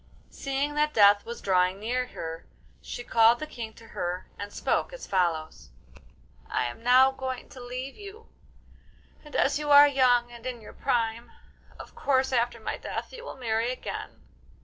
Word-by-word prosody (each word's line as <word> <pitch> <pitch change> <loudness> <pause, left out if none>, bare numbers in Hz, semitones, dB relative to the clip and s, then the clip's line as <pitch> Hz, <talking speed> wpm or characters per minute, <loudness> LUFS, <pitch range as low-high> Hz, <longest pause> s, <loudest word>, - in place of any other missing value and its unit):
Seeing 275 +2 -2
that 300 +1 +1
death 205 -1 +6
was 235 - -6
drawing 185 0 +2
near 250 +4 -1
her, 165 -6 -7 0.3
she 245 - -7
called 230 0 +5
the 310 - -5
King 230 -7 -7
to 230 - -15
her 175 +1 -3
and 205 0 -6
spoke - - -1
as - - -8
follows: 160 - -1 0.8
'I - - 0
am 120 - -6
now 255 +2 +6
going 260 -1 -5
to 260 - -12
leave 255 +2 -6
you, 415 +2 -11 1.0
and 300 - -12
as 285 +2 +2
you 300 -1 -3
are 290 0 +9
young 250 -3 +3
and 240 +1 -9
in 250 -2 -4
your 215 - -12
prime, 230 0 -1 0.5
of - - -11
course 265 -1 +1
after 235 -1 +1
my 220 - -4
death - - -5
you - - -9
will 485 - -8
marry 230 -1 0
again. 255 - -7
245 Hz, 170 wpm, -27 LUFS, 220-270 Hz, 1.0 s, are